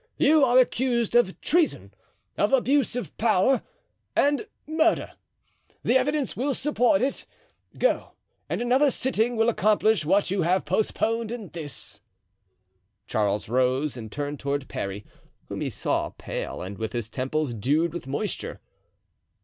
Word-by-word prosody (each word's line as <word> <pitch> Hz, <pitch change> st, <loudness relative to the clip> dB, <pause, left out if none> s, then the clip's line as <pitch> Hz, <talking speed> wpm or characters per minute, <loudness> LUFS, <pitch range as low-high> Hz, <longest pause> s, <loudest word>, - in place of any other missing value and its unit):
You 305 Hz, -1 st, +5 dB
are 250 Hz, -1 st, +4 dB
accused 245 Hz, -2 st, +2 dB
of 240 Hz, -6 st, +3 dB
treason, 335 Hz, 0 st, +1 dB, 0.4 s
of -, -, +1 dB
abuse 270 Hz, -1 st, +2 dB
of 245 Hz, -, -5 dB
power, 230 Hz, +3 st, +3 dB, 0.5 s
and 290 Hz, +8 st, +2 dB, 0.2 s
murder. 320 Hz, +1 st, +1 dB, 0.7 s
The 245 Hz, -, +2 dB
evidence 280 Hz, +1 st, +1 dB
will 270 Hz, +3 st, -1 dB
support 290 Hz, -1 st, +2 dB
it. 270 Hz, -, -2 dB, 0.5 s
Go, -, -, 0 dB, 0.4 s
and -, -, -1 dB
another 260 Hz, +4 st, +4 dB
sitting 245 Hz, -3 st, 0 dB
will 225 Hz, 0 st, +2 dB
accomplish 215 Hz, -3 st, +3 dB
what 190 Hz, +4 st, +2 dB
you 195 Hz, -1 st, +1 dB
have 180 Hz, +3 st, +1 dB
postponed 220 Hz, +5 st, 0 dB
in 225 Hz, -6 st, -6 dB
this." 145 Hz, -, -7 dB, 1.0 s
Charles 105 Hz, -2 st, 0 dB
rose 130 Hz, +4 st, +1 dB
and 110 Hz, -3 st, -8 dB
turned 145 Hz, +2 st, -4 dB
toward 140 Hz, 0 st, -2 dB
Parry, 100 Hz, +1 st, -5 dB, 0.4 s
whom -, -, -5 dB
he -, -, -1 dB
saw -, -, -1 dB
pale -, -, -6 dB
and 95 Hz, +2 st, -7 dB
with 110 Hz, -1 st, -3 dB
his 120 Hz, -3 st, -3 dB
temples 130 Hz, +3 st, -2 dB
dewed 150 Hz, +9 st, +1 dB
with 170 Hz, -6 st, -6 dB
moisture. 170 Hz, +10 st, -4 dB
215 Hz, 140 wpm, -26 LUFS, -, 1.0 s, You